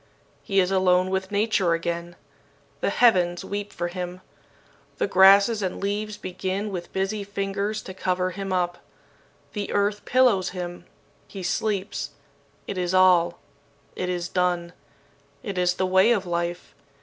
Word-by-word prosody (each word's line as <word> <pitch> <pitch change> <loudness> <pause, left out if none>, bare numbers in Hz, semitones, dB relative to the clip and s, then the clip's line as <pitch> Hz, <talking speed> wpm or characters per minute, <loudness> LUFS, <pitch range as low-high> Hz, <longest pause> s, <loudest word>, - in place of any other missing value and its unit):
"He 195 -1 +1
is 185 0 +2
alone 185 -1 +3
with 190 0 -1
Nature 205 -4 +1
again. 170 +1 -3 0.6
The - - 0
heavens 180 -7 +3
weep 205 0 -4
for 175 - -3
him. 180 0 -6 0.8
The - - +1
grasses 200 +3 +6
and 185 -2 -3
leaves 205 +1 -2
begin 190 +3 -3
with 175 -2 -6
busy 195 +2 -2
fingers 200 +1 -3
to 190 - -8
cover 185 -1 -1
him 195 +1 -5
up. 175 -1 0 0.7
The 205 -2 -4
earth 205 +1 0
pillows 245 -7 +3
him. 175 0 -6 0.4
He 195 -2 -8
sleeps. 200 +2 -2 0.5
It 195 - -4
is 180 +1 0
all. 175 -2 +5 0.6
It 180 - -3
is 175 -1 -2
done. 175 -1 0 0.7
It 200 -5 -4
is 180 0 +2
the 190 - 0
way 190 +4 +4
of 200 -4 -1
life. 175 0 -3
185 Hz, 145 wpm, -25 LUFS, 180-200 Hz, 0.8 s, grasses